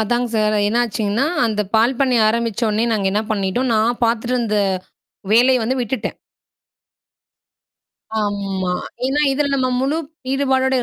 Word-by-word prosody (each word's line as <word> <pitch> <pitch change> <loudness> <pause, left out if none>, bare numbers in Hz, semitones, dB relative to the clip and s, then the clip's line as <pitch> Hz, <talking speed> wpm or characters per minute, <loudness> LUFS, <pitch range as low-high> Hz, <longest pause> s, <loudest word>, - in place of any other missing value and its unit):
அதாங் 240 +3 0
sir. 215 -1 +2
என்ன 230 +3 +1
ஆச்சுங்னா 220 +3 -1 0.2
அந்தப் 210 -3 -2
பால் 235 +4 +3
பண்ணைய 255 -4 +3
ஆரம்பிச்சோனய 230 0 0
நாங்க 205 -3 0
என்ன 210 +2 +1
பண்ணிட்டோம், 210 +5 -1
நான் 225 +2 +1
பாத்துட்டு 235 +2 0
இருந்த 220 -4 0 0.7
வேலைய 250 +3 +5
வந்து 260 +3 -1
விட்டுட்டேன். 245 +2 -3 2.1
ஆமா. 195 -3 -2 0.3
ஏன்னா 275 +3 0
இதுல 285 +1 0
நம்ம 260 -1 +1
முழு 275 +4 0 0.4
ஈடுபாடோட 265 -1 +1
இ - - -1
230 Hz, 135 wpm, -19 LUFS, 210-255 Hz, 2.1 s, வேலைய